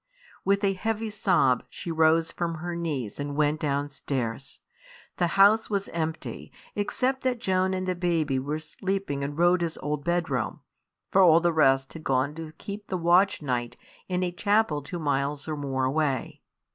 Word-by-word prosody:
With 200 Hz, +1 st, +2 dB
a 195 Hz, -1 st, +3 dB
heavy 220 Hz, +3 st, -2 dB
sob 180 Hz, -11 st, +2 dB
she 170 Hz, -, -6 dB
rose 160 Hz, +1 st, +3 dB
from 170 Hz, -1 st, -2 dB
her 175 Hz, +2 st, -5 dB
knees 145 Hz, -11 st, -3 dB
and 145 Hz, 0 st, -3 dB
went 150 Hz, +1 st, +2 dB
downstairs. 140 Hz, -4 st, -3 dB, 0.6 s
The 175 Hz, -, +2 dB
house 205 Hz, +3 st, +6 dB
was 200 Hz, -2 st, -1 dB
empty, 160 Hz, -1 st, -4 dB, 0.2 s
except 255 Hz, +6 st, 0 dB
that 255 Hz, -2 st, 0 dB
Joan 190 Hz, -2 st, +1 dB
and 185 Hz, 0 st, -3 dB
the 185 Hz, -, +1 dB
baby 165 Hz, -6 st, 0 dB
were 145 Hz, +3 st, -2 dB
sleeping 185 Hz, -1 st, -3 dB
in 140 Hz, +1 st, -3 dB
Rhoda's 175 Hz, 0 st, +2 dB
old 150 Hz, -1 st, -3 dB
bedroom; 160 Hz, -, -1 dB, 0.5 s
for 195 Hz, -, +5 dB
all 165 Hz, -3 st, +7 dB
the 170 Hz, 0 st, +1 dB
rest 135 Hz, -3 st, +3 dB
had 160 Hz, -, -9 dB
gone 135 Hz, +1 st, +1 dB
to 160 Hz, 0 st, -7 dB
keep 205 Hz, +5 st, -8 dB
the 185 Hz, -, -2 dB
watch 175 Hz, +1 st, +3 dB
night 120 Hz, -3 st, -2 dB, 0.3 s
in 180 Hz, 0 st, 0 dB
a 180 Hz, -, -1 dB
chapel 200 Hz, -4 st, +1 dB
two 145 Hz, +5 st, -6 dB
miles 145 Hz, -1 st, -1 dB
or 155 Hz, -, -2 dB
more 135 Hz, -2 st, -2 dB
away. 135 Hz, -1 st, -1 dB
165 Hz, 170 wpm, -27 LUFS, 145-185 Hz, 0.6 s, all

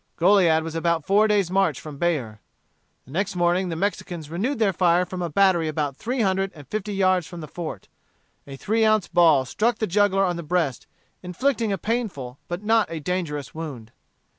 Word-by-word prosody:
Goliad 170 Hz, -3 st, +4 dB
was 160 Hz, 0 st, -6 dB
about 165 Hz, -1 st, 0 dB
four 210 Hz, +2 st, +4 dB
days' 200 Hz, -4 st, +1 dB
march 195 Hz, +1 st, +1 dB
from 150 Hz, -3 st, -9 dB
Bexar. 130 Hz, -12 st, -1 dB, 0.7 s
The 130 Hz, -, -15 dB
next 195 Hz, +5 st, -2 dB
morning 175 Hz, +1 st, +1 dB
the 165 Hz, -, -3 dB
Mexicans 175 Hz, -4 st, -3 dB
renewed 225 Hz, +12 st, -1 dB
their 215 Hz, -4 st, +2 dB
fire 175 Hz, 0 st, +3 dB
from 180 Hz, 0 st, -6 dB
a 175 Hz, -, -2 dB
battery 180 Hz, -1 st, +3 dB
about 150 Hz, -3 st, -2 dB
three 245 Hz, -, -2 dB
hundred 195 Hz, -1 st, +1 dB
and 145 Hz, -3 st, -13 dB
fifty 210 Hz, +3 st, -4 dB
yards 185 Hz, -3 st, +2 dB
from 175 Hz, -, -9 dB
the 155 Hz, -, -7 dB
fort. 165 Hz, +2 st, -7 dB, 0.6 s
A 135 Hz, -, -8 dB
three 220 Hz, +9 st, 0 dB
ounce 215 Hz, -3 st, +3 dB
ball 160 Hz, -6 st, +4 dB
struck 220 Hz, -, 0 dB
the 220 Hz, -, 0 dB
juggler 195 Hz, 0 st, +2 dB
on 175 Hz, -2 st, -1 dB
the -, -, -4 dB
breast, 160 Hz, -5 st, -1 dB, 0.3 s
inflicting 225 Hz, +5 st, -1 dB
a 195 Hz, -, 0 dB
painful 180 Hz, -, -3 dB
but 175 Hz, +3 st, -5 dB
not 225 Hz, 0 st, +2 dB
a 165 Hz, -, -5 dB
dangerous 150 Hz, -4 st, -3 dB
wound. 140 Hz, -9 st, -7 dB
180 Hz, 190 wpm, -24 LUFS, 160-200 Hz, 0.7 s, Goliad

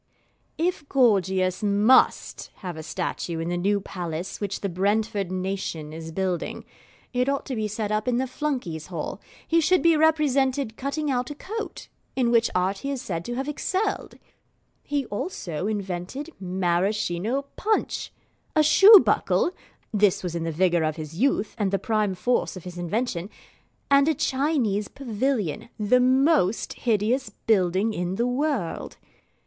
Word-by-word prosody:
If 330 Hz, -3 st, -1 dB
Gorgius 190 Hz, -7 st, +2 dB
MUST 210 Hz, +4 st, +3 dB
have 180 Hz, -4 st, -6 dB
a 160 Hz, -, -6 dB
statue 170 Hz, +1 st, -3 dB
in 165 Hz, +1 st, -3 dB
the 175 Hz, -, -1 dB
new 200 Hz, +3 st, +1 dB
Palace 175 Hz, -2 st, -5 dB
which 200 Hz, -1 st, -3 dB
the 200 Hz, -, -1 dB
Brentford 200 Hz, +1 st, 0 dB
nation 185 Hz, -5 st, -3 dB
is 165 Hz, 0 st, -7 dB
building, 185 Hz, 0 st, -2 dB, 0.5 s
it 250 Hz, +2 st, +1 dB
ought 280 Hz, 0 st, -1 dB
to 260 Hz, -, -4 dB
be 215 Hz, -1 st, -1 dB
set 210 Hz, 0 st, -3 dB
up 215 Hz, +2 st, -1 dB
in 245 Hz, -1 st, +2 dB
the 260 Hz, -, +1 dB
Flunkeys' 250 Hz, -, -3 dB
Hall. 170 Hz, -4 st, -5 dB, 0.3 s
He 330 Hz, 0 st, +3 dB
should 365 Hz, +4 st, +3 dB
be 335 Hz, -1 st, +5 dB
represented 280 Hz, -6 st, +2 dB
cutting 280 Hz, +3 st, -2 dB
out 250 Hz, -1 st, -1 dB
a 295 Hz, -, -6 dB
coat, 435 Hz, +8 st, -6 dB, 0.3 s
in 245 Hz, -3 st, +2 dB
which 230 Hz, -1 st, +4 dB
art 185 Hz, +2 st, +1 dB
he 275 Hz, -, -4 dB
is 275 Hz, -2 st, -2 dB
said 170 Hz, -7 st, -4 dB
to 240 Hz, -, -4 dB
have 270 Hz, +2 st, -3 dB
excelled. 380 Hz, +7 st, -2 dB, 0.7 s
He 285 Hz, -2 st, -2 dB
also 200 Hz, -, -4 dB
invented 205 Hz, -, -4 dB
Maraschino 190 Hz, +5 st, 0 dB
punch, 435 Hz, +1 st, -1 dB, 0.4 s
a 310 Hz, -, +5 dB
shoe 395 Hz, +7 st, +9 dB
buckle -, -, +2 dB, 0.4 s
(this 205 Hz, -3 st, +3 dB
was 180 Hz, -2 st, -3 dB
in 170 Hz, -1 st, -3 dB
the 165 Hz, -, -1 dB
vigour 175 Hz, +1 st, +2 dB
of 155 Hz, -1 st, 0 dB
his 160 Hz, +1 st, -7 dB
youth, 245 Hz, -5 st, +1 dB
and 205 Hz, -2 st, +1 dB
the 195 Hz, -, +1 dB
prime 210 Hz, -1 st, 0 dB
force 245 Hz, 0 st, 0 dB
of 180 Hz, -, -9 dB
his 180 Hz, -1 st, -8 dB
invention), 185 Hz, 0 st, -2 dB, 0.6 s
and 280 Hz, +1 st, +6 dB
a 320 Hz, -, +3 dB
Chinese 265 Hz, -8 st, 0 dB
pavilion, 235 Hz, -, -2 dB
the 220 Hz, +4 st, +3 dB
most 260 Hz, -, +3 dB
hideous 230 Hz, +3 st, 0 dB, 0.2 s
building 195 Hz, 0 st, +2 dB
in 180 Hz, -1 st, -2 dB
the 235 Hz, -, 0 dB
world. 250 Hz, -, -2 dB
215 Hz, 155 wpm, -25 LUFS, 185-270 Hz, 0.7 s, shoe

